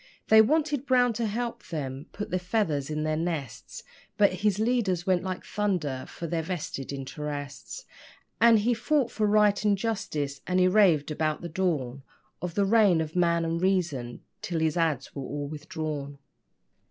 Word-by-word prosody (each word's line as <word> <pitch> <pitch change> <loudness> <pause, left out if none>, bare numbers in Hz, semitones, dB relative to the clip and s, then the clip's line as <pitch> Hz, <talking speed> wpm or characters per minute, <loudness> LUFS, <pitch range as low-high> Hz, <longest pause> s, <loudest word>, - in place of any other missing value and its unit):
They 220 0 +9
wanted 290 +2 +1
Brown 245 -2 +4
to 225 0 -1
help 235 +3 -4
them 140 -2 -5
put 210 - -6
the 185 - +1
feathers 180 -7 -1
in 155 0 -2
their 155 0 0
nests, 150 -9 -4 0.3
But 205 -2 +4
his 210 -2 +2
leaders 215 -6 0
went 185 -2 +2
like 185 0 -5
thunder 175 -11 -2
for 170 - -7
their 165 0 -1
vested 160 -6 -5
interests, 145 +1 -6 0.5
And 235 -1 +7
he 225 +4 +2
fought 250 +1 +1
for 215 -3 0
right 210 0 +3
and 205 -1 +3
justice 185 -11 -3
and 185 0 +1
he 185 - +5
raved 180 -7 +4
about 155 0 -1
the 170 - -4
dawn 150 -7 -1 0.4
Of 175 -1 -4
the 200 - +3
reign 200 -5 +4
of 160 0 -3
Man 170 -1 +2
and 165 +1 -1
Reason 170 -11 -1 0.2
till 180 -6 -2
his 160 -1 +1
ads. 160 -6 0
were 140 - -5
all 145 +2 -4
withdrawn. 150 -1 -5
175 Hz, 170 wpm, -27 LUFS, 150-210 Hz, 0.5 s, They